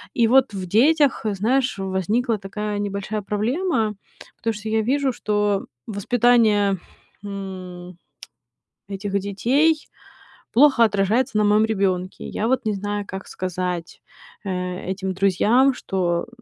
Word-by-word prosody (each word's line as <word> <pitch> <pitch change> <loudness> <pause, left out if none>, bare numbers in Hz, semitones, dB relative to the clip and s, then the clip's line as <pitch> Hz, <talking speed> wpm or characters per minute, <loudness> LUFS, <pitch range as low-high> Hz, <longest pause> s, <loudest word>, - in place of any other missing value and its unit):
И 235 - +4
вот 260 -1 +4
в 185 - -4
детях, 280 - +3
знаешь, 240 +5 0
возникла 205 +5 0
такая 205 +1 -4
небольшая 205 +1 -3
проблема, 225 - 0 0.4
потому 225 - -2
что 215 +1 -6
я 220 0 +2
вижу, 265 +3 +1
что 205 -3 0 0.2
воспитание, 215 -2 +3 0.4
м, 185 -3 -7 0.9
этих 200 0 -2
детей 265 +11 +1 0.7
плохо 265 -1 +6
отражается 210 +3 +1
на 210 - +3
моём 210 +1 +4
ребёнке. 190 -4 -1
Я 220 - -2
вот 255 0 0
не 215 - +1
знаю, 205 +1 -3
как 190 0 -7
сказать, 180 -2 -4 0.4
э, 180 -1 -3
этим 190 0 -3
друзьям, 205 +8 +3
что, 175 -7 -2
205 Hz, 120 wpm, -22 LUFS, 190-235 Hz, 0.9 s, плохо